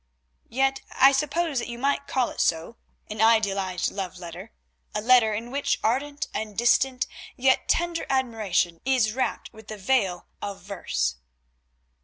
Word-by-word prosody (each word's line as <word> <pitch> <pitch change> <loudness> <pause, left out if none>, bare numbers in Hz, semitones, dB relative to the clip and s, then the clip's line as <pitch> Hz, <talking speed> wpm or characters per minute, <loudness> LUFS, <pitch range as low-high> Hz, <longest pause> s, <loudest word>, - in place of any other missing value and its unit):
"Yet 270 +2 +1 0.2
I 270 +1 +8
suppose 300 +1 0
that 235 - -4
you 235 -1 -6
might 280 +2 0
call 255 -2 0
it - - -3
so, 165 +8 0 0.3
an 215 0 -4
idealised 200 -5 +2
love 190 -2 -5
letter, 175 +4 -9 0.4
a - - +1
letter 225 -2 +5
in 235 +3 -5
which 280 +1 0
ardent 285 +5 -1
and 215 -2 -4
distant 250 +2 +3 0.3
yet 260 +1 +2
tender 345 0 0
admiration 215 -10 0
is 250 -5 +2
wrapt 260 -1 -2
with 220 -1 -14
the 215 - -7
veil 195 -4 0 0.2
of 200 -1 -5
verse." 60 - -2
230 Hz, 150 wpm, -25 LUFS, 200-265 Hz, 0.4 s, I